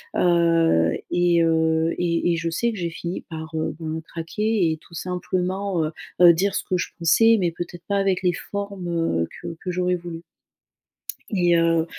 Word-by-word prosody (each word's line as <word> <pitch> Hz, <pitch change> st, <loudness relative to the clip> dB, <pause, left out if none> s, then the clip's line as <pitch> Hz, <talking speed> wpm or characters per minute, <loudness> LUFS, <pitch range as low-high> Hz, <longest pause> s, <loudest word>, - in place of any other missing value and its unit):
heu, 165 Hz, -, +3 dB, 0.2 s
et 175 Hz, -1 st, +3 dB
heu, 160 Hz, 0 st, +2 dB
et 170 Hz, 0 st, +1 dB
et 170 Hz, -, -1 dB
je 170 Hz, 0 st, -2 dB
sais 235 Hz, +7 st, 0 dB
que 215 Hz, -, -7 dB
j'ai 170 Hz, -1 st, -1 dB
fini 175 Hz, +2 st, -5 dB
par, 160 Hz, 0 st, -7 dB
heu, 160 Hz, -1 st, -2 dB
ben, 160 Hz, 0 st, -4 dB
craquer 180 Hz, +2 st, -1 dB
et 160 Hz, -, -3 dB
tout 170 Hz, +2 st, -16 dB
simplement, 180 Hz, +1 st, -2 dB
heu, 155 Hz, -, -3 dB, 0.3 s
heu, 175 Hz, -1 st, +9 dB
dire 195 Hz, +4 st, 0 dB
ce -, -, -1 dB
que 185 Hz, -, -1 dB
je -, -, -2 dB
pensais, 225 Hz, +7 st, +5 dB
mais 175 Hz, -3 st, +1 dB
peut-être 175 Hz, +1 st, -7 dB
pas 200 Hz, -, +1 dB
avec 195 Hz, -1 st, +1 dB
les 180 Hz, -, +3 dB
formes, 200 Hz, -1 st, -5 dB
heu, 165 Hz, -, 0 dB, 0.2 s
que 170 Hz, -1 st, -5 dB
que 185 Hz, -, -5 dB
j'aurais 180 Hz, 0 st, 0 dB
voulues 170 Hz, -1 st, -7 dB, 1.1 s
et 175 Hz, -3 st, +3 dB
heu, 165 Hz, -1 st, +3 dB
170 Hz, 185 wpm, -23 LUFS, 165-185 Hz, 1.1 s, heu